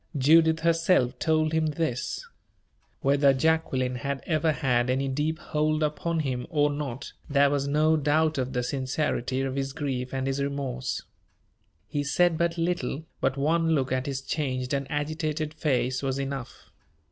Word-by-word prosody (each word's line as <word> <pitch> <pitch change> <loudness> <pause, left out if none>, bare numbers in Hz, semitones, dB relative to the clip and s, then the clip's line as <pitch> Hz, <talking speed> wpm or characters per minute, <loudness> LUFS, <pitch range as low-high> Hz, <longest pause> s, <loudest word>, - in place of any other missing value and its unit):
Judith 160 +4 +5
herself 165 -7 +2
told 155 -1 +1
him 160 -1 +2
this. 150 -5 -2 0.8
Whether 140 0 +4
Jacqueline 130 -4 +1
had 140 +2 -3
ever 160 0 +2
had 125 -5 +1
any 135 +2 +1
deep 150 +4 -1
hold 155 0 0
upon 160 +2 -1
him 130 -4 -3
or 145 -3 +2
not, 140 -2 -5 0.2
there 140 -1 +4
was 140 -1 0
no 155 +2 +3
doubt 155 +1 +2
of 130 0 -2
the 125 -1 0
sincerity 130 0 -1
of 135 -1 -2
his 135 -1 -2
grief 130 -4 -3
and 135 0 -2
his 135 +1 -1
remorse. 135 -3 -3 0.8
He 145 - -2
said 175 +4 +3
but 170 +1 0
little, 165 -3 -1
but 135 +1 0
one 165 +3 +2
look 135 -3 0
at 130 +1 -1
his 135 -1 -3
changed 130 -3 -2
and 140 -1 -2
agitated 155 +1 -2
face 130 -4 0
was 135 -1 -1
enough. 135 -2 -6
140 Hz, 160 wpm, -27 LUFS, 130-155 Hz, 0.8 s, Judith